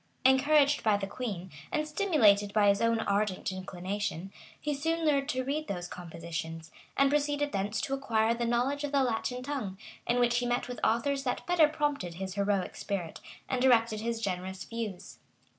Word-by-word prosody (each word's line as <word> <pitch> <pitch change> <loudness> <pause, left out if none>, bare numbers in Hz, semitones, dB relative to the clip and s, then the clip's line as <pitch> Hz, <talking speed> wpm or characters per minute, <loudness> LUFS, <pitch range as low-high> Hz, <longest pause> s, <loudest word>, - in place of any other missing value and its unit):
[] - - -36
Encouraged 285 +2 +5
by 215 -2 +3
the 200 - -3
queen, 195 -5 -5 0.2
and 305 0 0
stimulated 250 - +3
by 205 -2 +5
his 200 0 +2
own 230 0 +2
ardent 200 -2 0
inclination, 185 0 -4 0.3
he 300 - -2
soon 325 +3 -1
learned 280 -2 +2
to 255 -2 0
read 295 +4 -2
those 175 -2 -4
compositions; 165 -2 -6 0.3
and 275 0 +4
proceeded 290 0 +1
thence 200 +2 -1
to 270 - -2
acquire 230 -5 +1
the 235 0 -3
knowledge 245 +5 0
of 290 - -2
the 275 -1 +4
Latin 250 +1 -1
tongue, 255 -9 -4 0.3
in 240 +1 +2
which 240 0 +3
he 245 - -1
met 245 0 0
with 245 - -6
authors 270 +5 +1
that 250 -2 -2
better 345 -3 +5
prompted 290 - -1
his 190 +1 -5
heroic 200 -1 0
spirit, 180 -5 -4 0.3
and 255 - -1
directed 230 -4 +4
his 230 0 -2
generous 190 -2 -3
views. 225 -5 -6
230 Hz, 180 wpm, -30 LUFS, 195-275 Hz, 0.3 s, Encouraged